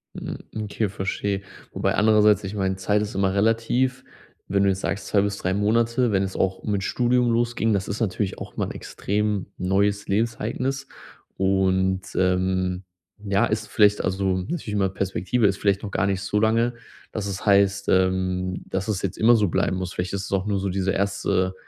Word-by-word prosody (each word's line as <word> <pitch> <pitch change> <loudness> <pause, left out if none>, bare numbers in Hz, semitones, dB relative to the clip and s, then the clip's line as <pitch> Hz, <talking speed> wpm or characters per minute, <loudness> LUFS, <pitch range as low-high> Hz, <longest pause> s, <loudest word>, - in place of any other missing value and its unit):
Hm, - - -5 0.2
okay, 110 0 -2
verstehe. 100 +1 -2 0.3
Wobei - - 0
andererseits, 105 -1 +4
ich 95 +2 -5
meine, 95 -2 0
Zeit 100 +2 +1
ist 105 -1 -4
immer 95 -1 +1
relativ, 115 +5 +1 0.4
wenn 100 0 +2
du 100 - +4
jetzt 95 0 -1
sagst, 100 - -3
2 100 - +3
bis 100 0 -1
3 95 - -1
Monate, 115 +4 +2
wenn 95 -1 +2
es 95 - -4
auch 95 0 -1
mit 100 -2 -1
Studium 125 +2 +2
losging, 115 -1 +1
das 100 -2 0
ist 105 +4 -4
natürlich 100 -2 -1
auch - - -9
mal - - 0
'n - - -5
extrem 105 -1 -2
neues 100 +2 +1
Lebensereignis 115 +5 -1 0.5
und, 95 -1 +2
ähm, 90 0 +1 0.4
ja, 100 -1 +2
ist 110 0 -2
vielleicht 105 -1 +4
also, 95 0 0
natürlich 115 - -4
immer 100 -2 +1
Perspektive 95 +4 -1
ist 100 - 0
vielleicht 100 0 +1
noch 100 - -5
gar 95 -1 +1
nicht 95 -1 -1
so 100 +1 0
lange, 115 +2 +2 0.4
dass 105 -2 -3
es 95 -1 -5
heißt, 100 -1 +3
ähm, 95 -1 +1
dass 95 +2 -3
es 100 -3 -1
jetzt 100 - -2
immer 120 +2 +5
so 105 -3 +2
bleiben 90 +2 0
muss. 90 -1 -4
Vielleicht 90 0 -3
ist 100 -1 -2
es - - -9
auch 95 -1 +1
nur 100 -2 0
so 100 - -2
dieser 95 0 0
1. 95 -1 0
100 Hz, 190 wpm, -24 LUFS, 95-105 Hz, 0.5 s, immer